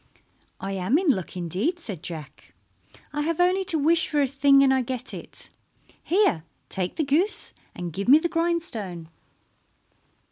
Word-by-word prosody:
"I 195 Hz, +1 st, -4 dB
am 195 Hz, +8 st, +1 dB
in 350 Hz, -4 st, +3 dB
luck 185 Hz, -5 st, -4 dB
indeed," 185 Hz, -, -1 dB
said 205 Hz, -, -7 dB
Jack. 160 Hz, -5 st, -9 dB, 0.6 s
"I 295 Hz, -, -1 dB
have 330 Hz, +2 st, -1 dB
only 365 Hz, +2 st, +3 dB
to 345 Hz, -3 st, +1 dB
wish 320 Hz, +3 st, +3 dB
for 295 Hz, -, 0 dB
a 285 Hz, -, +4 dB
thing 275 Hz, +1 st, +5 dB
and 265 Hz, -1 st, +4 dB
I 260 Hz, -, +2 dB
get 250 Hz, 0 st, -5 dB
it. -, -, -9 dB, 0.5 s
Here, 360 Hz, -, +2 dB, 0.3 s
take 185 Hz, -1 st, -3 dB
the 320 Hz, -, 0 dB
goose, 315 Hz, +9 st, 0 dB, 0.2 s
and 175 Hz, -2 st, -5 dB
give 200 Hz, +5 st, -4 dB
me 275 Hz, +4 st, +9 dB
the 330 Hz, +2 st, 0 dB
grindstone." 325 Hz, -, -2 dB
275 Hz, 165 wpm, -25 LUFS, -, 0.6 s, me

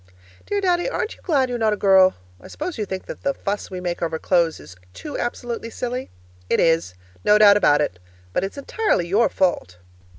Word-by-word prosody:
Dear 410 Hz, 0 st, -1 dB
Daddy, 360 Hz, +2 st, +1 dB
aren't 435 Hz, -, -3 dB
you -, -, -24 dB
glad 280 Hz, -6 st, +1 dB
you're 245 Hz, -1 st, -3 dB
not 220 Hz, -1 st, +2 dB
a -, -, -3 dB
girl? 190 Hz, -2 st, +5 dB, 0.3 s
I -, -, -12 dB
suppose 315 Hz, -3 st, -6 dB
you 210 Hz, -, -2 dB
think 190 Hz, 0 st, -5 dB
that -, -, -8 dB
the 275 Hz, 0 st, -1 dB
fuss 205 Hz, +1 st, -4 dB
we 185 Hz, -, -6 dB
make 175 Hz, -1 st, -4 dB
over 165 Hz, -1 st, -1 dB
clothes 170 Hz, -1 st, +1 dB
is 90 Hz, -, -13 dB, 0.2 s
too 300 Hz, -, -7 dB
absolutely 240 Hz, -1 st, -4 dB
silly? 250 Hz, +2 st, -4 dB, 0.4 s
It -, -, +2 dB
is. 165 Hz, -, +2 dB, 0.3 s
No 210 Hz, -, +5 dB
doubt 205 Hz, -1 st, +7 dB
about 150 Hz, -7 st, +4 dB
it. 95 Hz, -11 st, -2 dB, 0.3 s
But -, -, 0 dB
it's 195 Hz, +8 st, -5 dB
entirely 280 Hz, -, 0 dB
your 210 Hz, +6 st, +3 dB
fault. 175 Hz, -, -1 dB
205 Hz, 205 wpm, -22 LUFS, 175-255 Hz, 0.4 s, doubt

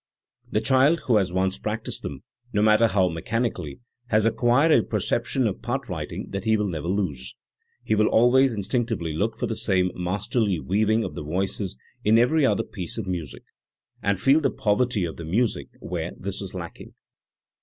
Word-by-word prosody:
The 105 Hz, -, 0 dB
child 135 Hz, +7 st, +3 dB
who 120 Hz, -4 st, +4 dB
has 95 Hz, -3 st, +1 dB
once 95 Hz, +1 st, 0 dB
practised 110 Hz, +1 st, -4 dB
them, 70 Hz, -2 st, -7 dB, 0.3 s
no 105 Hz, 0 st, +1 dB
matter 110 Hz, +1 st, +5 dB
how 95 Hz, -3 st, +2 dB
mechanically, 90 Hz, -, -3 dB, 0.3 s
has 110 Hz, -2 st, +2 dB
acquired 120 Hz, +7 st, +3 dB
a -, -, +6 dB
perception -, -, -1 dB
of -, -, -2 dB
part -, -, -3 dB
writing -, -, -5 dB
that 100 Hz, -, -3 dB
he 110 Hz, 0 st, +3 dB
will 105 Hz, -1 st, 0 dB
never 85 Hz, -2 st, -4 dB
lose. 85 Hz, -10 st, -2 dB, 0.5 s
He -, -, 0 dB
will 105 Hz, 0 st, +3 dB
always 130 Hz, +3 st, +4 dB
in 105 Hz, -3 st, -3 dB
stinctively 110 Hz, -, -1 dB
look 80 Hz, -, -1 dB
for -, -, -1 dB
the -, -, -3 dB
same 90 Hz, -1 st, +1 dB
masterly 100 Hz, +2 st, -1 dB
weaving 110 Hz, +5 st, +1 dB
of -, -, -5 dB
the -, -, -6 dB
voices 95 Hz, +1 st, -2 dB, 0.3 s
in 110 Hz, +2 st, +5 dB
every 135 Hz, +7 st, +3 dB
other -, -, +1 dB
piece 90 Hz, 0 st, -5 dB
of 110 Hz, -, -3 dB
music, 85 Hz, -7 st, -5 dB, 0.6 s
and 100 Hz, -1 st, 0 dB
feel 135 Hz, +8 st, +5 dB
the -, -, +2 dB
poverty 105 Hz, -2 st, +1 dB
of 80 Hz, -, -6 dB
the 85 Hz, -, -7 dB
music 90 Hz, -, 0 dB
where 85 Hz, -1 st, -4 dB
this 100 Hz, +1 st, -4 dB
is 95 Hz, -1 st, -6 dB
lacking. 85 Hz, -2 st, -8 dB
105 Hz, 185 wpm, -25 LUFS, 90-115 Hz, 0.6 s, a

